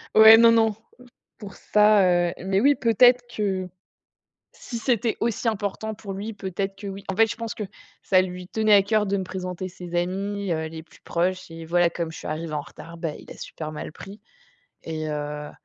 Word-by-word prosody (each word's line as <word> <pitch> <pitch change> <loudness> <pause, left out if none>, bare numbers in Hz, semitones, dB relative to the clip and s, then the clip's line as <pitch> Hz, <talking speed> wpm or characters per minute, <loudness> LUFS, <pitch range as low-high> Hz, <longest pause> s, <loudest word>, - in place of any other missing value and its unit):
Ouais, 220 +1 +10
non, 230 0 +7
non, 225 -2 +3 0.6
pour 205 -3 -10
ça, 190 -5 +3
heu, - - -7
mais 195 0 +1
oui, 285 +4 +5
peut-être 245 +1 +5 0.2
que 190 -3 -1 0.8
si 235 -3 -7
c'était 235 -2 0
aussi 230 +1 -1
important 215 0 -2
pour 200 -2 -8
lui 210 +3 -5
peut-être 195 0 -4
que, 200 +1 -8
oui. 195 0 -7
En 190 - -3
fait, 225 +1 +5
je 220 - -5
pense 230 -2 -4
que 215 - -5 0.4
ça 185 -1 +4
lui 180 0 -6
tenait 215 -1 +2
à 200 - +8
cœur 215 0 +1
de 200 0 0
me 190 - -1
présenter 185 0 -5
ses 175 -1 -8
amis, 195 +2 -2
heu, 160 -1 -1
les 160 0 -9
plus - - -21
proches 180 +1 -2
et 165 0 -8
voilà, 175 +1 +2
comme 165 -1 -4
je - - -10
suis - - -8
arrivée 155 +1 -4
en 150 - -1
retard, 170 +3 -12
ben, 165 -2 -4
il - - -15
l'a - - -10
super 155 -1 -7
mal 150 - -7
pris 200 +2 -11 0.6
et 155 -1 -5
heu 150 0 -5
195 Hz, 205 wpm, -24 LUFS, 175-215 Hz, 0.8 s, Ouais